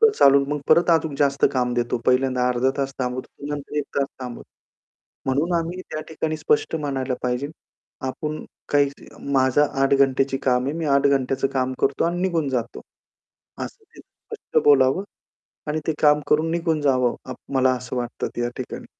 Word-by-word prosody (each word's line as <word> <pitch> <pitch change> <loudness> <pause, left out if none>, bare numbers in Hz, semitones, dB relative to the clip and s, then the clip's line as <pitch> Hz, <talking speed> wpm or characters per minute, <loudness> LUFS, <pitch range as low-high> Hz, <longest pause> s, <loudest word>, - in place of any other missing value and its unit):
पुढे 450 -1 +7
चालून, 140 0 +6
मग 145 -1 -2
परत 170 +2 +5
अजून 160 -2 +2
जास्त 140 -1 +2
काम 125 -2 0
देतो. 120 0 0
पहिल्यांदा 125 -1 +2
अर्धा 125 +1 +2
तास 135 0 -1
थांबवतो, 125 0 -3
मग 145 - -5
नंतर 145 +1 -7
एक 145 - -1
तास 140 - +2
थांबवतो. 125 -2 -7 0.8
म्हणून 145 +7 +1
आम्ही 170 +3 -4
त्या 155 - -3
ठिकाणी 160 0 -2
स्पष्ट 440 - +1
म्हणायला 135 -3 -2
पाहिजे. 125 +3 -1 0.6
आपण 155 +3 -4 0.2
काही 145 -1 +3
त - - -15 0.2
माझं 130 +1 +4 0.2
8 135 0 +4
घंटेची 135 0 +2
काम 125 -1 +2
आहे 140 - -1
मी 165 - -2
8 140 0 +3
घंट्याचं 135 -1 +1
काम 130 -1 0
करतो 135 - +1
आणि 175 +1 -1
निघून 170 -6 0
जातो. 120 - -3 0.8
असं - - -11
ते - - -17
स्पष्ट - - -4
बोलावं, 135 +5 +5 0.7
आणि 150 +1 -1
ते 160 - +2
काम 150 -1 +5
करून 155 +2 +2
निघून 165 -2 0
जावं. 130 -4 +2
आप 130 - -5 0.2
मला 130 0 +4
असं 125 +1 -6
वाटतं, 120 -1 -3
त्या 120 0 -1
ठिकाणी. 130 - -6
140 Hz, 175 wpm, -23 LUFS, 130-150 Hz, 0.8 s, पुढे